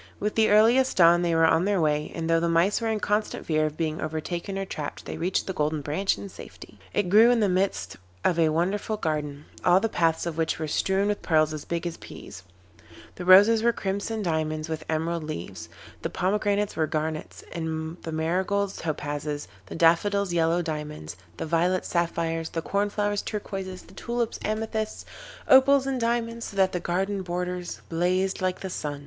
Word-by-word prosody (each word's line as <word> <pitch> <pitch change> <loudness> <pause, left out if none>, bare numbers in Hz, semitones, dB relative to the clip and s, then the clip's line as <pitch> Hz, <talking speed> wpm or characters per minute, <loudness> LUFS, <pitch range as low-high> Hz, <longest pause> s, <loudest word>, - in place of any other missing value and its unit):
With 210 +1 -1
the 220 -1 +3
earliest 235 +5 +4
dawn 170 -1 +6
they 170 -1 +1
were 165 0 +5
on 160 +2 +3
their 200 -2 +1
way, 150 -2 0
and 165 -1 -3
though 165 0 +3
the 170 0 0
Mice 170 +7 +2
were 230 - -1
in 220 -1 0
constant 210 +1 -1
fear 155 -1 +1
of 155 - -7
being 160 -1 -2
overtaken 170 +5 -4
or 195 - -2
trapped, 150 -5 -6
they - - -5
reached 180 +2 -1
the 190 - -3
Golden 150 -1 -1
Branch 155 +8 0
in - - -7
safety. - - -12
It 205 -3 0
grew 215 +6 +7
in 245 -1 +3
the 210 - +3
midst 180 - -1 0.3
of 170 -2 +2
a 160 -1 +4
wonderful 190 +7 -1
garden, 150 -4 -3 0.2
all 180 +1 +5
the 225 - 0
paths 165 -4 +1
of 165 -1 -4
which 160 - 0
were 155 - -3
strewn 190 +6 +1
with 205 0 -1
pearls 155 -2 +2
as 155 - -6
big 170 0 -3
as 170 -1 -4
peas. 95 - -11 0.7
The 180 - -7
roses 205 +5 +7
were 235 +1 +4
crimson 205 +2 -3
diamonds, 155 -2 -1
with 160 -1 -4
emerald 160 +1 -1
leaves. 90 - -6 0.3
The - - -2
pomegranates 205 +2 0
were 160 -1 +1
garnets, 155 0 -4
the 160 0 -4
marigolds 190 +5 -1
topazes, 145 -2 -3 0.2
the - - -7
daffodils 180 +4 +3
yellow 170 +1 +2
diamonds, 150 - -5 0.2
the - - -3
violets 175 +3 +1
sapphires, 165 -1 -1
the 165 - -4
corn 200 +2 0
flowers 205 0 -1
turquoises, 195 -3 -5
the - - -17
tulips 235 -1 -3
amethysts, 220 0 -3 0.4
opals 270 +1 +6
and 265 -2 -2
diamonds, 230 0 -1
so 200 - -10
that 190 -1 +4
the 180 - -2
garden 190 +3 -1
borders 180 0 -4
blazed 185 +3 0
like 185 -1 -1
the 190 - -4
sun. 145 -4 -4
175 Hz, 190 wpm, -26 LUFS, 160-200 Hz, 0.7 s, grew